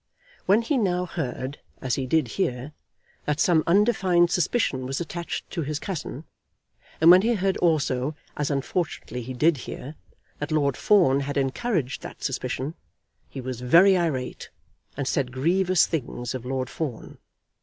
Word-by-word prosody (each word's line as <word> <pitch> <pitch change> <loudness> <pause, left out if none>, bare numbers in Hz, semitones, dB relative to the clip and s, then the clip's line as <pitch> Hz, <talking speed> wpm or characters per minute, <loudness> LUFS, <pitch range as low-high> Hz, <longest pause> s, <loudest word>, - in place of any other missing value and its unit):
When 205 +5 +4
he 265 +3 +1
now 180 -4 +1
heard, 135 -5 -4 0.2
as 130 -3 -2
he 130 -2 -1
did 150 -3 +2
hear, 130 - -2 0.5
that 150 0 -1
some 165 -3 +4
undefined 185 -3 +3
suspicion 160 - 0
was 135 +1 -2
attached 175 0 -5
to 170 - -2
his 150 0 -2
cousin, 160 -4 -5 0.8
and 165 +2 +8
when 180 +1 +8
he 235 +3 +2
heard 195 -1 0
also, 150 -4 +1 0.2
as 150 -2 -1
unfortunately 140 -3 -2
he 125 +2 -6
did 155 +4 +3
hear, 130 +3 -7 0.5
that 150 +2 -4
Lord 140 -4 +2
Fawn 175 -10 +4
had 140 +1 -3
encouraged 140 - -1
that - - -10
suspicion, 130 +2 -2 0.6
he 135 - -7
was 125 -1 -5
very 170 +10 +6
irate, 155 -8 -2 0.5
and 140 -2 -2
said 135 -3 0
grievous 180 +7 +3
things 125 -5 -4
of 125 -2 -6
Lord 130 0 -2
Fawn. 140 -8 -5
150 Hz, 155 wpm, -25 LUFS, 130-180 Hz, 0.8 s, and